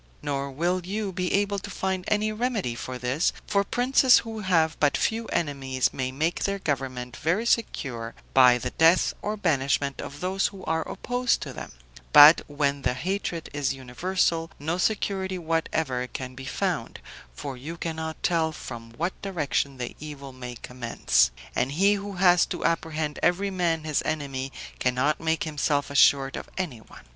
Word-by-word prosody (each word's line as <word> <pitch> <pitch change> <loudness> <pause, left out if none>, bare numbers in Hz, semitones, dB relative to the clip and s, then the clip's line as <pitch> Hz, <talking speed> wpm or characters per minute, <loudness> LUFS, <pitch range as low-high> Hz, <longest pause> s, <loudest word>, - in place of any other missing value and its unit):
Nor 140 -1 -2
will 175 +6 -1
you 200 +2 -3
be 180 -1 -2
able 200 0 +1
to 200 - -8
find 190 -1 -2
any 215 0 +1
remedy 215 - -1
for 130 +1 -6
this; 125 +6 +1
for 200 -1 +2
princes 250 +4 +4
who 225 -1 -6
have 165 -5 +2
but 145 -1 +3
few 225 0 -1
enemies 135 -4 -1
may 130 -1 -2
make 155 +6 -1
their 200 0 0
government 130 -7 -3
very 180 +9 0
secure 125 - -1 0.2
by 125 -2 +7
the 125 +1 -4
death 165 +3 +4
or 210 +1 -2
banishment 140 -6 0
of 145 +2 -8
those 190 +2 +1
who 195 -2 -10
are 160 0 0
opposed 245 0 0
to - - -6
them; - - -8 0.4
but 150 +3 +10
when 145 -1 0
the 125 -1 0
hatred 175 +2 -3
is 145 -2 -1
universal, 165 +5 -1
no 160 +5 -2
security 190 -2 0
whatever 160 -6 -1
can 130 0 -6
be 135 +1 -9
found, 130 - -2 0.4
for 140 -2 -5
you 150 +7 -7
cannot 160 -1 -4
tell 165 -2 +2
from 115 -6 -8
what 175 +4 -1
direction 145 -7 -1
the 120 -1 -5
evil 140 -3 -8
may 125 -1 -7
commence; 120 - +1 0.3
and 130 +3 0
he 195 +6 +4
who 200 0 -4
has 180 -1 +5
to - - -4
apprehend 160 -2 -1
every 195 +3 +2
man 170 -4 0
his 155 -2 0
enemy 135 -3 -3 0.3
cannot 130 +4 +1
make 160 0 0
himself 145 -2 -1
assured 135 -1 +4
of - - -7
anyone. 145 -13 -6
160 Hz, 165 wpm, -26 LUFS, 135-185 Hz, 0.4 s, but